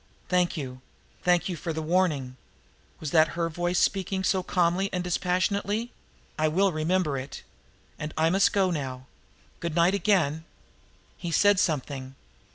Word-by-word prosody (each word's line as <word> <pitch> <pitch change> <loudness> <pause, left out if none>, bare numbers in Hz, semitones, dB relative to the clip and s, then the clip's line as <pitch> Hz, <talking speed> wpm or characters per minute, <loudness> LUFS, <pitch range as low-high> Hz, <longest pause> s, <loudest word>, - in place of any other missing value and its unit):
"Thank 180 -1 +2
you 130 -3 -6 0.4
thank 175 -1 +2
you 180 - -3
for 165 +1 -4
the 160 - -3
warning." 155 -7 +1 0.6
Was 155 -3 -5
that 160 -1 +5
her 165 -1 0
voice 175 +2 -1
speaking 190 0 +1
so 190 0 +2
calmly 180 +1 +1
and 180 -2 -2
dispassionately? 200 +6 0 0.5
"I 155 - +3
will 190 +5 +2
remember 155 -2 0
it. 130 +2 -8 0.6
But 150 0 -4
I 160 +1 +3
must 195 +2 +4
go 190 -2 +2
now. 130 -5 -4 0.5
Good 170 -3 -3
night 170 +2 +4
again!" 180 -7 +1 0.7
He 175 - -5
said 205 +2 +4
something. 135 -6 -2
175 Hz, 150 wpm, -27 LUFS, 155-185 Hz, 0.7 s, that